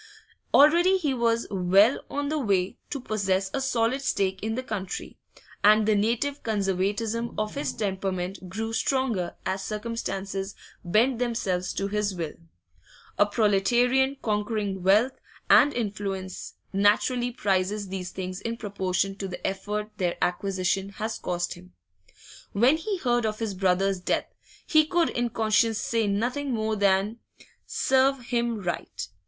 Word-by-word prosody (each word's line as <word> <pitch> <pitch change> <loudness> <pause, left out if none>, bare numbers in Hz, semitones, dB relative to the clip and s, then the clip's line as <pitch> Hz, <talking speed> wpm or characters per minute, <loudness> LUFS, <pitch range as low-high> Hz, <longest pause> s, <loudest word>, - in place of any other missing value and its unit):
Already 345 +6 +6
he 300 -7 0
was 235 -1 +1
well 195 +5 +4
on 285 0 -2
the 310 0 0
way 195 -7 0
to 280 - -3
possess 195 -5 -1
a 270 - -1
solid 255 0 +1
stake 190 -7 0
in 220 +1 -2
the 255 - -3
country, 195 -6 -5 0.4
and 215 +1 +6
the 215 - +4
native 235 +7 0
conservatism 210 +3 -1
of 215 0 -2
his 285 - -2
temperament 190 -2 -3
grew 225 +4 -4
stronger 235 -8 0
as 190 +1 -2
circumstances 205 -3 -4 0.3
bent 225 +7 +2
themselves 195 -7 -1
to 195 - -2
his 205 -1 -1
will; 165 -4 -4 0.9
a 205 - +6
proletarian 245 +6 +2
conquering 210 -2 -1
wealth 205 +8 +4 0.4
and 290 - +7
influence 200 -5 -4 0.2
naturally 215 +5 +2
prizes 200 -3 -1
these 185 -1 -4
things 185 0 -5
in 230 0 -3
proportion 195 -2 -1
to 195 0 -5
the 180 - -7
effort 210 +2 -3
their 180 -3 -1
acquisition 190 +1 0
has 220 +2 -4
cost 175 -1 -2
him. 90 0 -15 0.8
When 245 +9 +4
he 395 +4 -3
heard 240 -6 +1
of 215 0 -3
his 220 -3 -3
brother's 190 0 +1
death, 180 - 0 0.4
he 310 -1 +5
could 340 +2 +1
in 240 0 -1
conscience 220 0 +2
say 225 -1 0
nothing 250 +8 -1
more 220 0 -1
than 200 +2 +2 0.5
'Serve 270 +1 +2
him 235 -3 -1
right! 175 - -4
210 Hz, 140 wpm, -26 LUFS, 195-240 Hz, 0.9 s, and